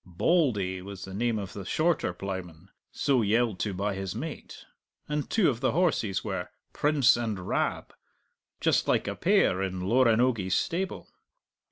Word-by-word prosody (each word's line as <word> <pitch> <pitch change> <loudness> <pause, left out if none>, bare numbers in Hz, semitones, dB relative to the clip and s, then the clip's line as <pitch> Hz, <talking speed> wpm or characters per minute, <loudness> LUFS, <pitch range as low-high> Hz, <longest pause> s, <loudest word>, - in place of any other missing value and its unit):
"Bauldy" 95 - +1
was 100 0 -8
the 95 - -9
name 115 +2 0
of 100 -2 -5
the 100 - -6
shorter 155 - +1
ploughman, 90 -2 -7 0.2
so 135 -4 +1
yelled 110 -1 +1
to 105 - -1
by 100 +2 -2
his 95 0 -4
mate; 150 +6 -7 0.4
and 150 -1 -2
two 220 -5 +3
of 120 -5 0
the 130 - +1
horses 145 - +1
were 95 -4 -4 0.2
"Prince 145 -4 +4
and 110 -6 -3
Rab" - - -1 0.7
just - - +2
like - - +1
a - - -2
pair 95 - +2
in 95 -1 -3
Loranogie's 115 -2 +2
stable. 190 +3 -2
105 Hz, 155 wpm, -28 LUFS, 95-130 Hz, 0.7 s, Prince